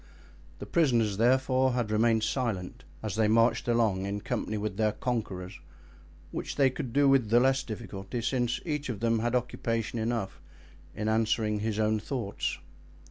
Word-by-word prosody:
The - - -7
prisoners, 120 - +2
therefore, 130 +2 +3
had 120 -4 -1
remained 110 0 +3
silent 110 -8 -2 0.2
as 105 -4 -3
they 110 -1 +3
marched 115 +2 +3
along 110 -5 +1
in 100 +1 -3
company 110 - -2
with 105 -2 -3
their 110 -1 +2
conquerors—which 90 -7 -6
they 135 -2 +4
could 125 -1 -5
do 140 +3 +4
with 135 -5 +4
the 120 +2 +5
less 135 +2 +3
difficulty 110 -1 -6
since 125 -1 0
each 150 -4 -2
of 110 -5 -3
them 115 0 +1
had 120 +2 0
occupation 115 -2 -2
enough 110 -5 -2 0.5
in 105 - -3
answering 110 -1 +1
his 110 0 -2
own 110 0 +2
thoughts. 110 -2 -3
115 Hz, 155 wpm, -29 LUFS, 105-125 Hz, 0.5 s, the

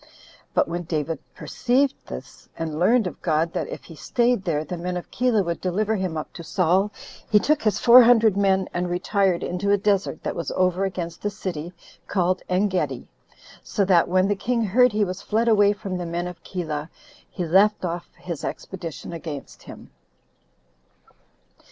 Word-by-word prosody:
But - - +3
when 170 +1 -3
David 160 -1 -2 0.2
perceived 265 +2 +1
this, - - -10
and 160 -2 -4
learned 225 +5 +4
of 180 - -6
God 165 0 0
that - - -2
if - - -8
he 165 - -12
staid 240 - 0
there 155 -4 0
the 180 - -5
men 180 +1 -3
of 175 - -8
Keilah 240 -4 +2
would 170 -1 -3
deliver 210 +4 0
him 185 -5 -2
up 155 - -6
to 170 - -8
Saul, 180 +4 +2 0.4
he 210 - +5
took 300 +7 +2
his 215 -3 +1
four 245 +1 +8
hundred 230 -4 +5
men 190 -1 +2
and 175 0 -1
retired 185 0 +1
into 180 +3 -2
a 205 - +5
desert 195 -5 0
that - - -3
was 170 - -3
over 185 +1 +2
against 175 -3 -5
a 205 - +1
city 175 -5 -5 0.4
called 185 -1 +1
Engedi. 185 0 0 0.5
So 200 - -1
that 180 -3 +4
when 185 +1 +3
the 205 - +1
king 230 +3 -1
heard 245 +5 +4
he 210 0 +1
was 185 +1 -5
fled 225 +2 0
away 205 -3 +5
from 200 -3 -4
the 175 - -4
men 170 +1 -2
of 180 -1 -8
Keilah, 155 -4 -4 0.4
he 180 - -4
left 195 +4 +3
off 170 0 -4
his 170 -5 -6
expedition 170 -3 -6
against 145 - -7
him. - - -12
185 Hz, 180 wpm, -24 LUFS, 170-205 Hz, 0.5 s, four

